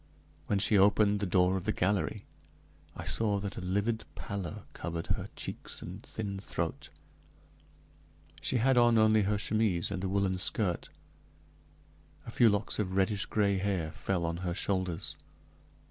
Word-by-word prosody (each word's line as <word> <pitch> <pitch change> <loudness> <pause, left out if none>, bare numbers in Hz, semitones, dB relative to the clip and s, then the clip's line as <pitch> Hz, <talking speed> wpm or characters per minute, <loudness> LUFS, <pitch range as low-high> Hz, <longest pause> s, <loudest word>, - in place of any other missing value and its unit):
When 105 - +1
she 100 +1 +3
opened 105 +1 +4
the 100 - -1
door 90 +1 +3
of 95 -1 -3
the 110 - +2
gallery, 100 +1 0 0.7
I - - -5
saw 105 -3 +2
that 100 0 -4
a - - -5
livid 100 +5 0
pallor 95 -6 -5
covered 85 0 -4
her - - -5
cheeks - - -6
and 95 +4 -8
thin 100 -4 -5
throat; 100 - -4 1.5
she 130 - +1
had 125 +2 +4
on 120 -1 +5
only 110 0 +5
her 105 +1 +1
chemise 105 -4 0
and 90 - -3
a 95 - -1
woolen 95 -1 +1
skirt; 90 -2 -1 1.4
a - - -7
few 120 - +5
locks 105 +1 0
of 95 -3 -1
reddish 95 +1 +1
gray 100 -2 +1
hair 95 -5 -1
fell 90 0 -2
on 85 0 -2
her 90 -1 -3
shoulders. 95 -3 -2
100 Hz, 155 wpm, -31 LUFS, 90-105 Hz, 1.5 s, on